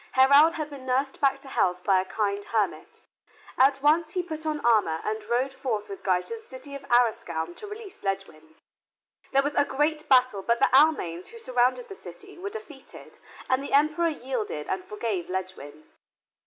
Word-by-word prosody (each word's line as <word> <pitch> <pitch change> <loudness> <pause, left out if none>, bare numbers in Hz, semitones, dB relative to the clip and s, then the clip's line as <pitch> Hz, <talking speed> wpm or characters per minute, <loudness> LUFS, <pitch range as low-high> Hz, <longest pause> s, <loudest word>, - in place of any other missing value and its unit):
Heraud 280 +5 +6
had 310 -2 -5
been 265 -2 -10
nursed 270 +2 -1
back 275 -1 +3
to 275 - -12
health 180 -8 0
by 190 -2 +3
a - - -7
kind 205 0 -2
hermit. 215 -4 -2 0.5
At 270 +1 +3
once 315 +2 +3
he 365 -2 -1
put 315 -2 -6
on 305 -1 -1
armor 210 -9 +3
and 215 0 -3
rode 250 +4 0
forth 225 -6 -3
with 195 - -8
Guy 185 -2 +2
to 460 - -6
the - - -13
city 280 -6 -11
of 280 - -6
Arrascoun 220 -9 +1
to 420 - -9
release 420 -1 -10
Ledgwin. 175 -6 -5 0.8
There 275 0 +3
was 290 +1 -2
a - - +3
great 300 +3 -1
battle 255 -6 +4
but 235 +4 +1
the 255 - +3
Almains 265 - +3
who 465 - -12
surrounded 255 - 0
the 400 - -8
city 395 +1 -12
were 395 +2 -4
defeated 375 -11 -12 0.3
and 260 +1 +1
the - - -6
Emperor 305 +4 +3
yielded 245 - -4
and 190 -1 -2
forgave 210 -4 -4
Ledgwin. 180 -6 -6
260 Hz, 185 wpm, -26 LUFS, 200-300 Hz, 0.8 s, Heraud